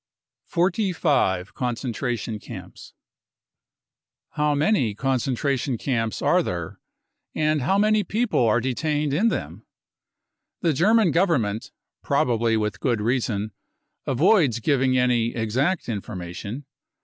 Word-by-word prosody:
Forty 185 Hz, +3 st, +1 dB
Five 100 Hz, -, +1 dB
Concentration 120 Hz, -2 st, -3 dB
Camps. -, -, -11 dB, 1.4 s
How 150 Hz, -1 st, +1 dB
many 145 Hz, -, +1 dB
concen 130 Hz, +1 st, 0 dB
tration 135 Hz, -2 st, -1 dB
camps 115 Hz, -3 st, -2 dB
are -, -, +4 dB
there, -, -, -5 dB, 0.6 s
and 155 Hz, -1 st, +1 dB
how 190 Hz, +10 st, +2 dB
many 215 Hz, +1 st, +3 dB
people 215 Hz, -, 0 dB
are 115 Hz, +2 st, +3 dB
detained 145 Hz, +4 st, -1 dB
in 200 Hz, +10 st, +3 dB
them? -, -, -3 dB, 1.0 s
The 165 Hz, -4 st, +2 dB
German 205 Hz, -, +4 dB
Government, 135 Hz, -, +1 dB, 0.3 s
probably 115 Hz, -2 st, +1 dB
with 105 Hz, -1 st, -2 dB
good 120 Hz, -5 st, 0 dB
reason, 110 Hz, -2 st, -1 dB, 0.6 s
avoids 145 Hz, -, +3 dB
giving 130 Hz, 0 st, +2 dB
any 120 Hz, -2 st, +1 dB
exact 130 Hz, -, 0 dB
information. 100 Hz, +3 st, -6 dB
130 Hz, 110 wpm, -24 LUFS, 115-155 Hz, 1.4 s, are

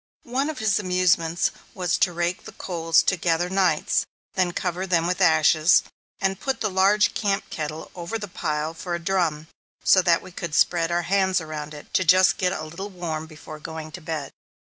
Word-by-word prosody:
One 265 Hz, +5 st, -1 dB
of 315 Hz, -, -5 dB
his 215 Hz, -1 st, +1 dB
amusements 180 Hz, -3 st, +1 dB, 0.2 s
was 180 Hz, -3 st, 0 dB
to 180 Hz, -, +3 dB
rake 175 Hz, +1 st, -2 dB
the -, -, -10 dB
coals 165 Hz, -2 st, +1 dB
together 175 Hz, -1 st, 0 dB
nights, 185 Hz, -5 st, +2 dB, 0.3 s
then 185 Hz, -2 st, +1 dB
cover 180 Hz, +1 st, -3 dB
them 170 Hz, -2 st, +2 dB
with 180 Hz, +2 st, -1 dB
ashes, 160 Hz, -1 st, +5 dB, 0.4 s
and 195 Hz, -1 st, -1 dB
put 270 Hz, -1 st, -2 dB
the 215 Hz, -, -1 dB
large 205 Hz, +3 st, +3 dB
camp 200 Hz, -2 st, -1 dB
kettle 155 Hz, 0 st, -5 dB
over 175 Hz, +5 st, -4 dB
the 205 Hz, -1 st, -6 dB
pile 155 Hz, -3 st, -3 dB
for 175 Hz, +1 st, -4 dB
a -, -, -4 dB
drum, 170 Hz, -4 st, 0 dB, 0.4 s
so 190 Hz, -, +6 dB
that 170 Hz, -2 st, +2 dB
we 185 Hz, -, -11 dB
could 170 Hz, -3 st, -5 dB
spread 170 Hz, -1 st, +2 dB
our 175 Hz, 0 st, +1 dB
hands 190 Hz, +1 st, +2 dB
around 155 Hz, -2 st, -6 dB
it, 145 Hz, -, -13 dB
"to -, -, +3 dB
get -, -, -14 dB
just 185 Hz, +3 st, +5 dB
a 180 Hz, -4 st, 0 dB
little 170 Hz, +6 st, -7 dB
warm 165 Hz, -4 st, -5 dB
before 155 Hz, 0 st, -11 dB
going 160 Hz, 0 st, -7 dB
to 175 Hz, -, -9 dB
bed." 155 Hz, -4 st, -4 dB
175 Hz, 195 wpm, -24 LUFS, 160-190 Hz, 0.4 s, so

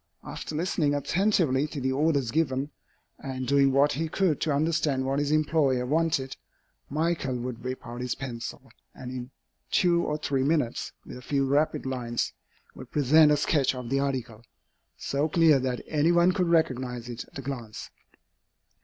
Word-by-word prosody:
After 155 Hz, -, -6 dB
listening 155 Hz, -3 st, 0 dB
attentively 155 Hz, -3 st, +1 dB
to 150 Hz, -1 st, -6 dB
the 130 Hz, 0 st, 0 dB
orders 140 Hz, -3 st, +1 dB
given, 145 Hz, -2 st, 0 dB, 0.5 s
and 130 Hz, -1 st, -5 dB
doing 140 Hz, +1 st, +4 dB
what 140 Hz, +2 st, +4 dB
he 160 Hz, +3 st, -2 dB
could 175 Hz, -4 st, +1 dB
to 155 Hz, -, +1 dB
understand 145 Hz, -2 st, +1 dB
what 135 Hz, +1 st, 0 dB
his 145 Hz, -1 st, 0 dB
employer 150 Hz, -4 st, +2 dB
wanted, 150 Hz, -2 st, 0 dB, 0.5 s
Michael 155 Hz, -3 st, -1 dB
would 120 Hz, -1 st, -6 dB
whip 130 Hz, 0 st, -5 dB
out 120 Hz, +1 st, -7 dB
his 125 Hz, -1 st, -2 dB
pencil, 120 Hz, -4 st, -7 dB, 0.2 s
and 125 Hz, -1 st, -8 dB
in 125 Hz, -1 st, -6 dB, 0.4 s
two 170 Hz, -1 st, +3 dB
or 150 Hz, -, -1 dB
three 140 Hz, -3 st, -1 dB
minutes, 140 Hz, -4 st, 0 dB
with 125 Hz, -, -9 dB
a -, -, -10 dB
few 135 Hz, +1 st, 0 dB
rapid 145 Hz, +2 st, +1 dB
lines, 120 Hz, -3 st, -2 dB, 0.4 s
would -, -, -11 dB
present 150 Hz, +2 st, +5 dB
a 150 Hz, -, +4 dB
sketch 145 Hz, -2 st, +1 dB
of 125 Hz, -2 st, -6 dB
the 135 Hz, -, +2 dB
article, 130 Hz, -5 st, -3 dB, 0.6 s
so 145 Hz, +3 st, -1 dB
clear 160 Hz, -3 st, +5 dB
that 130 Hz, -1 st, -2 dB
any 155 Hz, +2 st, +2 dB
one 175 Hz, +1 st, +4 dB
could 180 Hz, -2 st, 0 dB
recognize 130 Hz, -7 st, 0 dB
it 120 Hz, -1 st, -6 dB
at -, -, -13 dB
a 135 Hz, -, -6 dB
glance. 120 Hz, -5 st, -6 dB
140 Hz, 170 wpm, -27 LUFS, 130-155 Hz, 0.6 s, present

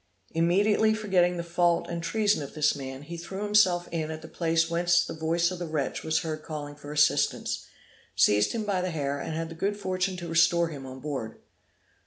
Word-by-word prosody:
Immediately 205 Hz, +6 st, +3 dB
forgetting 185 Hz, -5 st, +2 dB
the 170 Hz, -, -3 dB
fault 170 Hz, 0 st, +1 dB
and 170 Hz, 0 st, -4 dB
treason 210 Hz, +2 st, +1 dB
of 140 Hz, -, -8 dB
this 150 Hz, -1 st, +2 dB
man, 135 Hz, 0 st, -7 dB
he 170 Hz, +3 st, -7 dB
threw 190 Hz, +4 st, -6 dB
himself 190 Hz, -4 st, +3 dB
in 160 Hz, -2 st, -2 dB
at 160 Hz, 0 st, -6 dB
the -, -, -8 dB
place 165 Hz, -1 st, +1 dB
whence 175 Hz, +1 st, +2 dB
the -, -, -6 dB
voice 165 Hz, +2 st, +1 dB
of 180 Hz, -, -6 dB
the 175 Hz, -, -4 dB
wretch 155 Hz, -4 st, -2 dB
was 160 Hz, 0 st, +1 dB
heard 155 Hz, -1 st, -4 dB
calling 150 Hz, -2 st, -6 dB
for 145 Hz, 0 st, -10 dB
assistance, 150 Hz, 0 st, +1 dB, 0.5 s
seized 105 Hz, 0 st, +4 dB
him 225 Hz, -2 st, -2 dB
by 200 Hz, -3 st, 0 dB
the 185 Hz, -, -1 dB
hair, 145 Hz, -4 st, -2 dB
and 155 Hz, -, -4 dB
had 165 Hz, 0 st, -3 dB
the -, -, -7 dB
good 200 Hz, +5 st, -2 dB
fortune 185 Hz, -1 st, -1 dB
to 175 Hz, -1 st, -6 dB
restore 170 Hz, +1 st, +3 dB
him 140 Hz, -4 st, -8 dB
on 130 Hz, 0 st, -9 dB
board. 135 Hz, -6 st, -5 dB
170 Hz, 210 wpm, -27 LUFS, 155-180 Hz, 0.5 s, seized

